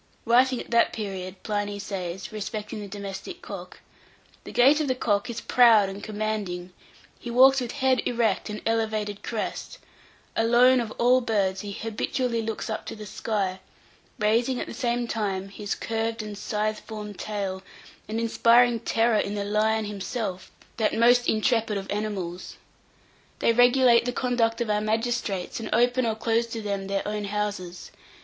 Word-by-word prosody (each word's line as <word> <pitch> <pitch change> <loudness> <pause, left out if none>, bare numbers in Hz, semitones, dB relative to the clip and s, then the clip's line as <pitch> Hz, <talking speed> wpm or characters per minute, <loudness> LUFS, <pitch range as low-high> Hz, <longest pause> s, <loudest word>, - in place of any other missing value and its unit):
Writing 250 +2 +4
at - - -9
that 235 0 +4
period, 190 -3 -6
Pliny 205 -1 -2
says, 190 -2 -5
respecting 215 0 -5
the 205 - -6
domestic 200 - -7
cock, - - -9 0.6
"The - - -8
gait 275 +5 +5
of 300 - -1
the 255 - +1
cock 215 -1 0
is 235 -1 -4
proud 225 -5 +5
and 195 +1 -7
commanding; 210 -4 -3 0.5
he 240 - -7
walks 265 +2 +6
with 245 -1 -4
head 265 -3 +2
erect 225 -4 0
and 210 0 -6
elevated 215 -2 -1
crest; 225 -3 -4 0.6
alone, 245 +3 +5
of 235 -2 -2
all 250 +2 +4
birds, 200 -5 0
he 205 - -6
habitually 230 +3 -2
looks 225 0 -4
up 220 - -4
to - - -5
the 215 -1 -9
sky, 200 -2 -2 0.6
raising, 235 +4 +1
at - - -3
the - - -8
same 240 0 -1
time, 195 -4 -2
his 205 0 -4
curved 225 0 -2
and 210 -1 -6
scythe 215 +1 -2
formed 210 -3 -8
tail, 195 -3 -3 0.5
and 220 +1 -2
inspiring 235 +1 +4
terror 225 -1 +2
in 205 0 -2
the 200 -1 -2
lion 215 +1 +1
himself, 200 -1 -4 0.3
that 220 -2 +1
most 240 +1 +5
intrepid 220 -1 +1
of 195 - -4
animals. 200 -4 -4 0.8
They 230 - +2
regulate 245 -1 +5
the 245 - -1
conduct 240 -2 0
of 235 - -1
our 210 0 +1
magistrates, 220 -4 -1
and 225 - -5
open 245 +2 +3
or 220 - 0
close 230 +1 0
to 230 -1 -5
them 200 -2 -3
their 195 0 -2
own 210 0 -3
houses. 200 -3 -4
220 Hz, 165 wpm, -26 LUFS, 205-235 Hz, 0.8 s, walks